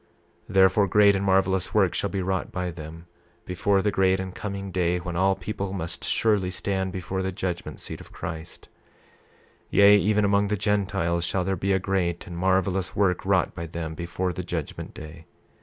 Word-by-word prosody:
28:31 - - -10
Therefore, 95 +1 +5
great 100 +1 +5
and 95 - -1
marvelous 95 -1 +2
works - - +3
shall - - -1
be 95 -2 -2
wrought 95 0 -2
by 90 -1 -3
them, 80 0 -9 0.4
before 95 +2 +1
the 105 - +2
great 95 -1 +2
and 95 -1 -5
coming 100 -1 -5
day 90 -1 +1
when 90 -1 -5
all 95 +2 +3
people 95 0 -4
must 85 -3 -4
surely 105 -5 +2
stand 95 0 -2
before 95 +1 -3
the 95 0 -2
judgment 90 -1 -4
seat - - -8
of - - -15
Christ; 85 0 -7 1.0
28:32 - - -38
Yea 100 +1 +8
even 105 +1 +2
among 100 0 +3
the 105 +1 -1
Gentiles 95 -4 0
shall 90 +2 0
there 95 +1 0
be 95 +2 -1
a 95 - +4
great 90 -3 -1
and 85 - -8
marvelous 95 +1 0
work 95 -3 +1
wrought 95 -2 +1
by 85 - -6
them, 80 -1 -5
before 85 +2 -3
that 90 0 -6
judgment 80 -4 -5
day. 80 +1 -10
95 Hz, 190 wpm, -25 LUFS, 85-100 Hz, 1.0 s, Yea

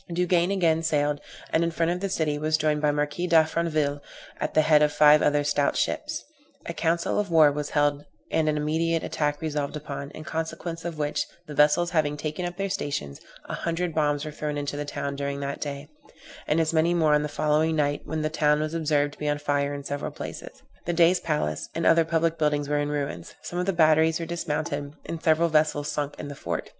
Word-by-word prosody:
Duguesne 175 +1 +2
again 165 -5 +2
sailed, 150 -2 0 0.3
and 160 - +3
in 170 - +1
front 165 0 0
of 180 - -2
the 195 +1 -2
city 155 -5 -1
was 155 +1 +1
joined 150 -1 +1
by 150 - +2
the 145 - +2
Marquis 150 +4 -1
D'Affranville, 160 -3 +2 0.4
at - - -3
the 155 - +5
head 150 -1 +5
of 150 0 +4
five 150 0 +6
other 145 0 +2
stout 145 0 +1
ships. - - -2 0.4
A 170 - -4
council 170 +3 0
of 205 -2 -1
war 160 -3 +6
was 145 0 -3
held 145 -1 +1 0.3
and 155 -1 +2
an 150 - 0
immediate 160 +2 0
attack 150 -1 -1
resolved 150 -2 -2
upon, 140 -2 -6
in 155 - -10
consequence 165 +1 -4
of 170 -2 -4
which, 150 -1 -1 0.2
the 150 - -8
vessels 150 +4 +3
having 150 -3 +1
taken 155 +4 -3
up 175 0 -8
their 195 0 -1
stations, 75 - -4 0.2
a - - -6
hundred 170 0 -2
bombs 145 -1 +1
were 155 - -5
thrown 150 0 -4
into 145 0 -3
the 145 0 -3
town 140 -1 -4
during 140 0 -3
that 140 0 -4
day, 140 0 -5 0.6
and 150 - +2
as 160 0 +1
many 165 +2 +3
more 160 -3 +3
on 150 - +4
the 150 - -3
following 155 +2 +1
night, 145 -1 0
when 160 -1 -3
the 155 - 0
town 150 -1 +2
was 155 +1 -2
observed 150 -3 +1
to - - -17
be 150 - -1
on 145 - +1
fire 145 -1 0
in 140 -1 -5
several 145 0 -3
places; - - -9 0.2
the 175 - +1
Dey's 170 +2 +4
palace, 150 - -2
and 165 - -1
other 165 0 +5
public 165 0 0
buildings 150 -2 +1
were 145 0 +1
in 145 0 -1
ruins; 140 -12 -4
some 175 - -4
of 180 - -1
the - - +3
batteries 160 -1 +4
were 165 - -3
dismounted, 150 -4 -3
and 165 -1 -5
several 160 +1 +3
vessels 150 -2 +1
sunk 145 -1 -3
in 145 - -6
the 145 - -6
fort. 140 - -4
155 Hz, 225 wpm, -26 LUFS, 145-165 Hz, 0.6 s, five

